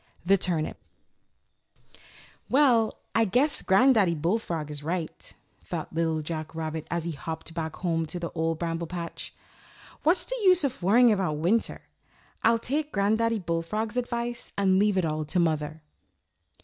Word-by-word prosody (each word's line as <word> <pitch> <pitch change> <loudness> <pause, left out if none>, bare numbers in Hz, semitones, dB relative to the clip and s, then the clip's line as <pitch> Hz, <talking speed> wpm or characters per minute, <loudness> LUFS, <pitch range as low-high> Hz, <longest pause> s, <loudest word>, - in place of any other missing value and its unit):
THE 195 +2 +5
TURNIP 175 -5 -1 1.7
"WELL, 250 -6 +4 0.2
I 225 - +4
guess 250 +8 +2
Granddaddy 195 -3 +4
Bullfrog 165 -2 -1
is 145 -1 -6
right," 165 +2 -4 0.3
thought - - -5
Little 160 -1 0
Jack 155 0 -5
Rabbit, 160 -1 -4
as 170 -1 -1
he 170 - -3
hopped 160 +2 -6
back 160 -2 -4
home 165 -3 -1
to 175 - -5
the 170 -1 -4
Old 165 0 -1
Bramble 165 0 -3
Patch. 170 -1 -6 0.7
"What's 330 +5 +2
the - - -4
use 365 -4 +5
of 265 -6 -2
worrying 230 +6 +5
about 190 -6 +1
winter? 185 +9 0 0.6
I'll 230 +1 +4
take 290 +6 -2
Granddaddy 220 +3 +2
Bullfrog's 185 +5 -2
advice 240 -1 -3
and 190 -1 +3
leave 205 -1 +3
it 185 - +2
all 155 0 -1
to 155 +5 -2
Mother." 155 -2 -1
180 Hz, 150 wpm, -27 LUFS, 160-230 Hz, 1.7 s, THE